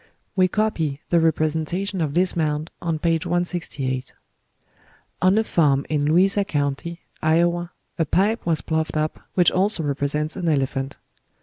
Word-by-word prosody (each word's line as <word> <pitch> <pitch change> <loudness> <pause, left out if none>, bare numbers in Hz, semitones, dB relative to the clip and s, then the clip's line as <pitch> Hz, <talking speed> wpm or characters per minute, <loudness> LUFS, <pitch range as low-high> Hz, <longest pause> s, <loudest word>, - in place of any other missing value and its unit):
We 185 -1 +4
copy 175 -9 -1
the 170 - +5
representation 165 +4 0
of 150 -2 -1
this 180 +1 +3
mound 155 -1 -1
on 165 -2 -1
page 165 0 0
168. 150 -7 -2 1.1
On 185 +3 +4
a 220 - +3
farm 145 -9 +2
in 150 -2 +1
Louisa 190 +6 +4
County, 150 +1 -2 0.2
Iowa, 170 +2 +2 0.3
a 165 - +3
pipe 210 +9 +1
was 160 -4 +1
ploughed 160 -1 -1
up 155 0 -1 0.2
which 180 -2 +5
also 190 -2 +1
represents 145 +2 -1
an 170 - -1
elephant. 135 -2 -1
160 Hz, 140 wpm, -23 LUFS, 150-180 Hz, 1.1 s, the